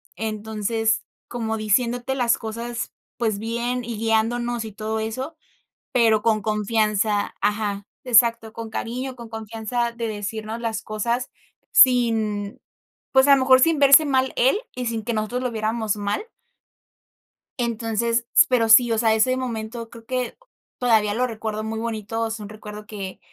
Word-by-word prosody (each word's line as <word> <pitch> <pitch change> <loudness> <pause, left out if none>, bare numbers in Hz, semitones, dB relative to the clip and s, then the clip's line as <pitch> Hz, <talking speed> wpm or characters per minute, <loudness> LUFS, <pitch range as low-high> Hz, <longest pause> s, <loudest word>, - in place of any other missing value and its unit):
Entonces, 220 +2 -1 0.3
como 225 -2 -3
diciéndote 240 +4 0
las 245 -3 +2
cosas, 235 +2 -5 0.3
pues 220 -4 0
bien, 235 +2 -2
y 235 -1 -5
guiándonos, 230 +1 0
y 220 - -7
todo 220 +1 -3
eso, 260 +9 -4 0.6
pero 225 -3 +3
con 220 -1 +2
confianza. 215 -1 0
Ajá, 205 -1 -1 0.2
exacto, 230 -2 +4
con 230 0 -7
cariño, 250 +4 -4
con 235 -2 -10
confianza 225 +2 -3
de 235 -1 -4
decirnos 215 +1 -5
las 225 -2 -3
cosas 235 +4 -2 0.4
sin, 220 -5 +3 0.5
pues, 265 0 +5
a 280 - +9
lo 275 - +2
mejor, 260 0 +6
sin 325 +3 +3
verse 280 +3 +8
mal 265 -1 +1
él, 265 +11 +3 0.2
y 250 -1 -4
sin 225 -2 -2
que 235 - -2
nosotros 220 +4 -2
lo 250 - -1
viéramos 220 -1 -1
mal. 205 - -2 1.4
Entonces, 230 0 0
s - - +7
pero 235 -3 +3
sí, 235 +2 +7
o 225 - +1
sea, 220 -1 +3
ese 255 +4 +2
momento 230 -2 -5
creo 230 -1 -13
que 250 -1 -3 0.4
todavía 220 -4 +3
lo 250 +4 +1
recuerdo 220 -2 -4
muy 220 0 -4
bonito, 225 0 -3
es 225 0 -5
un 210 -1 -8
recuerdo 210 0 -9
que 200 -3 -7
225 Hz, 155 wpm, -23 LUFS, 215-240 Hz, 1.4 s, a